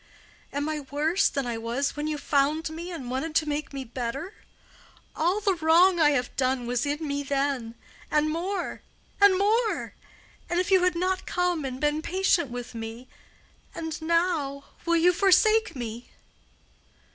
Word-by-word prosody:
Am 285 +1 -2
I 310 -1 -2
worse 295 +6 +1
than 275 -2 -2
I 235 -2 -3
was 240 +5 -2
when 295 +1 -3
you 305 -1 -2
found 295 +3 +1
me 335 +3 -6
and 265 -8 -6
wanted 305 +5 -3
to 315 - +2
make 295 0 -3
me 275 -1 -5
better? 255 - -5 0.8
All 350 +6 +1
the 405 -2 +2
wrong 345 +2 +4
I 305 -2 +6
have 250 -4 -1
done 260 -2 0
was 245 +2 -1
in 295 +2 -2
me 285 0 -1
then—and 275 +2 -2
more—and 375 +2 0
more—if 405 -4 -2
you 375 -1 +5
had 365 -1 +2
not 370 +2 -1
come 355 -3 0
and 260 -1 -4
been 295 +1 +1
patient 355 -3 +1
with 245 0 -7
me. 230 +2 -7 0.7
And 320 -1 -5
now—will 335 -1 0
you 355 +2 +4
forsake 430 +4 +4
me?" 235 -1 -6
305 Hz, 145 wpm, -26 LUFS, 270-355 Hz, 0.8 s, I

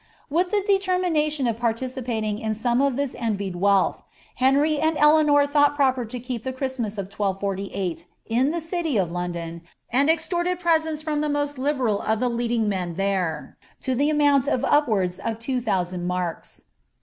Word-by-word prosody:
'' - - -32
* - - -43
With 355 +4 +2
the 410 0 +1
determination 360 - +1
of 230 -1 -1
participating 235 -2 -2
in 220 -1 -2
some 240 +3 +1
of 280 -2 +2
this 280 -1 -2
envied 200 -5 -2
wealth, 195 +1 +2 0.4
Henry 285 +4 +3
and 315 0 +1
Eleanor 300 -1 +5
thought 290 0 +3
proper 260 -4 +2
to 245 +3 -6
keep 245 -1 -5
the 260 - -2
Christmas 260 -5 -3
of 200 - -2
1248 195 -3 -3 0.2
in 245 +5 +1
the 340 +2 -1
city 325 - -1
of 180 -4 0
London, 170 -1 -4 0.3
and 275 +5 +3
extorted 345 +2 0
presents 320 -3 +1
from 300 -1 -1
the 300 - -1
most 290 -1 -1
liberal 260 -7 0
of 220 0 0
the 250 - +1
leading 235 -2 0
men 180 -4 -2
there, 185 -5 -2 0.2
to 260 - -1
the 285 +4 +2
amount 290 -3 +3
of 255 -4 +1
upwanls 205 -11 +2
of 225 +2 -3
two 250 +2 -2
thousand 180 -4 -1
marks.' 180 -2 -4
250 Hz, 175 wpm, -24 LUFS, 200-295 Hz, 0.4 s, Eleanor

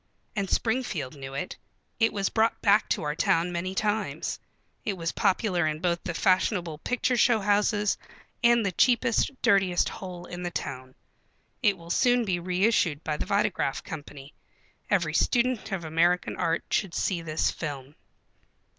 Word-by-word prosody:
And 200 -3 -1
Springfield 220 - -1
knew 135 -1 -8
it. 140 - -4 0.4
It 225 -1 +4
was 195 -1 -1
brought 225 0 +1
back 205 0 +3
to 200 - 0
our 150 0 -1
town 165 +3 +1
many 180 +2 -3
times. 205 -8 -1 0.4
It 210 - -1
was 165 -1 -2
popular 185 -4 +1
in 155 -1 -1
both 170 +1 -1
the 175 -3 -4
fashionable 180 -3 +1
picture 250 +5 0
show 235 -1 +4
houses 205 +1 +1 0.4
and 235 -2 +5
the 195 - +1
cheapest, 250 - +2
dirtiest 190 -3 +3
hole 180 -2 -8
in 180 0 -7
the 175 - -2
town. 130 -5 -6 0.7
It 205 -5 +3
will 170 0 -9
soon 245 +4 +3
be 185 -4 0
reissued 180 -4 +1
by 155 - -1
the - - -4
Vitagraph 200 -8 0
Company. 145 -2 -9 0.6
Every 170 -6 +1
student 245 +6 +1
of 180 -4 -3
American 170 +3 +1
Art 165 +1 0
should 195 -4 0
see 180 -4 0
this 155 -1 0
film. 140 -3 -6
180 Hz, 155 wpm, -27 LUFS, 165-210 Hz, 0.7 s, and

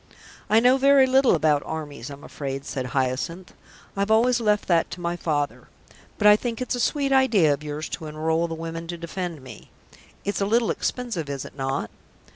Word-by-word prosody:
"I 220 - +6
know 250 +3 +5
very 275 0 +6
little 260 -4 +4
about 150 -2 +2
armies, 145 -5 -6
I'm 140 0 -10
afraid," 135 -1 -5
said 130 -3 -4
Hyacinth. 135 +8 -2 0.4
"I've 200 +1 -1
always 235 +3 +4
left 210 -2 +1
that 170 -2 +2
to - - -8
my 170 0 -2
father. 150 -4 -2 0.5
But 210 - -1
I 210 0 +9
think 230 +1 -3
it's 255 - -2
a 245 - -2
sweet 280 +3 0
idea 225 - +4
of 145 - -5
yours 150 +1 -4
to 160 - -6
enrol 160 +2 0
the 165 - -5
women 165 0 -6
to 175 0 -5
defend 170 -3 -5
me. 125 -4 -12 0.6
It's 200 0 -2
a 195 - +1
little 230 +2 +2
expensive, 225 - -3
is 140 -1 -4
it - - -12
not?" 135 -5 -3
170 Hz, 195 wpm, -24 LUFS, 145-225 Hz, 0.6 s, I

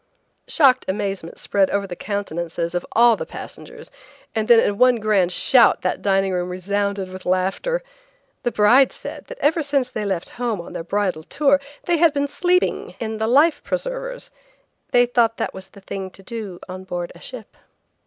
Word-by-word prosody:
Shocked 275 -5 +4
amazement 195 -3 -3
spread 195 -2 +1
over 200 0 0
the 180 -2 -7
countenances 170 -4 -3
of 175 - -3
all 235 0 +6
the - - -5
passengers, 475 -1 -10 0.4
and 220 -1 -1
then 235 -1 +7
in 205 -2 0
one 250 -1 +6
grand 210 -5 +2
shout 240 +5 +4
that - - -1
dining 195 -1 +1
room 180 0 -1
resounded 200 +1 -2
with 185 0 -9
laughter. 195 - 0 0.6
The 240 - -1
bride 235 +6 +5
said - - -9
that - - -9
ever 315 +3 +2
since 280 -4 0
they 215 - -3
left 190 -4 -2
home 230 -5 -1
on 170 - -9
their - - -5
bridal 185 -2 -1
tour 280 - +2 0.2
they 345 -1 +1
had 325 -2 +4
been 285 0 +1
sleeping 360 +5 0
in 220 -1 -4
the 220 - 0
life 290 +7 +4
preservers. - - -4 0.6
They 245 0 +5
thought 235 -2 +1
it - - -2
was 190 0 -9
the 200 - -16
thing 190 0 -6
to 195 - -15
do 205 -4 -6
on 185 0 -7
board 175 -2 -5
a - - -16
ship. 245 -5 -10
210 Hz, 185 wpm, -21 LUFS, 190-265 Hz, 0.6 s, then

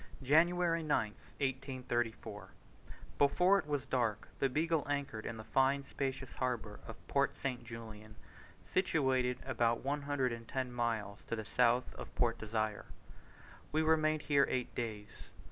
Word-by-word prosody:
January 165 +4 +4
9th, 110 -9 +1 0.2
1834. 125 -5 -2 0.7
Before 180 +7 +5
it - - -6
was 145 -3 -1
dark 115 -5 0
the 135 - +3
Beagle 160 +3 +1
anchored 140 -6 -2
in 115 - -4
the 110 - -7
fine 135 +4 +2
spacious 135 -2 -3
harbour 120 -5 -2
of - - -10
Port - - +1
St. 130 -3 -3
Julian, 110 -2 -9 0.5
situated 130 -8 +2
about 120 -2 +1
one 145 +2 0
hundred 140 -3 0
and 115 0 -8
ten 130 -2 -2
miles 115 -4 -2
to - - -1
the 110 -1 -5
south 125 +3 +2
of - - -9
Port 120 -2 +1
Desire. 110 -1 -2 0.9
We 155 +1 +2
remained 155 -1 +3
here 140 -2 +4
eight 125 -1 -1
days. 110 -3 -5
130 Hz, 145 wpm, -35 LUFS, 115-145 Hz, 0.9 s, Before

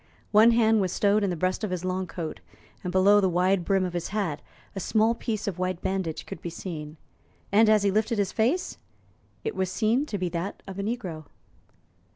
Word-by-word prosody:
One 220 +2 +7
hand 225 -2 +4
was 185 -2 0
stowed 205 +2 +2
in 200 - +1
the 180 - -1
breast 185 +5 -1
of 215 - -1
his 180 -1 -3
long 185 0 -2
coat, 165 -3 -5 0.4
and 180 - -3
below 200 +3 +5
the 190 - +2
wide 180 +1 +2
brim 195 0 +1
of 180 - -4
his 175 -1 -2
hat 195 -8 -2 0.3
a - - -3
small 220 +3 +2
piece 225 -2 -4
of 185 -3 -3
white 185 -1 -2
bandage 190 -5 -2
could 195 -5 -8
be 170 - -4
seen; 160 -3 -7 0.5
and, 215 +2 +5
as 215 -2 +4
he 200 - +3
lifted 215 +3 +1
his 200 -2 0
face, 255 +12 0 0.6
it - - -3
was 190 -1 -1
seen 235 +8 +1
to 210 - -3
be 185 -1 -1
that 170 +4 -4
of 195 0 -7
a - - 0
negro. 200 -8 -4
195 Hz, 210 wpm, -26 LUFS, 180-215 Hz, 0.6 s, One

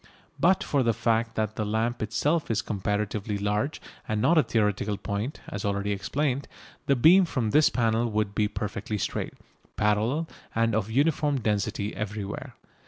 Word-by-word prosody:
But 185 +2 +4
for 140 - +1
the 115 -3 +2
fact 115 -1 +1
that 110 -1 -2
the 110 - 0
lamp 110 +3 -1
itself 145 +9 0
is 110 0 0
comparatively 105 +1 -2
large 105 +8 -1 0.3
and 110 -1 -1
not 165 +10 +4
a 155 - +7
theoretical 105 -4 0
point, 105 +7 -4
as 100 - -5
already 100 0 -1
explained, 135 +7 -1 0.4
the 140 - +4
beam 170 +10 +7
from 130 -10 -1
this 150 +4 +5
panel 115 0 +1
would 105 -2 -1
be 105 0 +2
perfectly 105 0 -4
straight, - - -3 0.4
parallel, 110 +10 +1 0.3
and 115 0 +2
of 110 -1 0
uniform 145 +2 +2
density 105 -1 -1
everywhere. 105 0 -5
110 Hz, 160 wpm, -27 LUFS, 105-130 Hz, 0.4 s, a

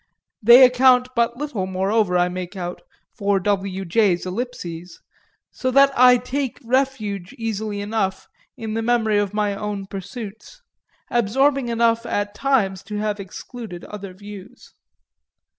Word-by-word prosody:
They 240 +4 +9
account 250 0 +4
but 235 0 +1
little, 255 -10 -3
moreover, 190 0 +1
I 175 0 +3
make 180 +1 -6
out, 175 -1 -5 0.3
for 200 -2 +1
W. 195 0 -1
J.'s 185 -1 +2
eclipses; 180 -5 -6 0.5
so 255 - -2
that 275 +2 +5
I 250 0 +7
take 260 +1 -3
refuge 230 -7 -1
easily 215 -2 -3
enough 205 -2 -2 0.3
in 220 -1 -5
the 225 - -1
memory 225 -3 +2
of 205 0 -2
my 205 -1 0
own 205 -1 -4
pursuits, 205 - -9 0.5
absorbing 260 +4 +2
enough 230 0 +1
at 205 -1 -2
times 205 -7 +1
to 210 +1 -6
have 210 0 -2
excluded 195 0 -8
other 200 -3 -8
views. 205 +4 -12
210 Hz, 135 wpm, -22 LUFS, 195-245 Hz, 0.5 s, They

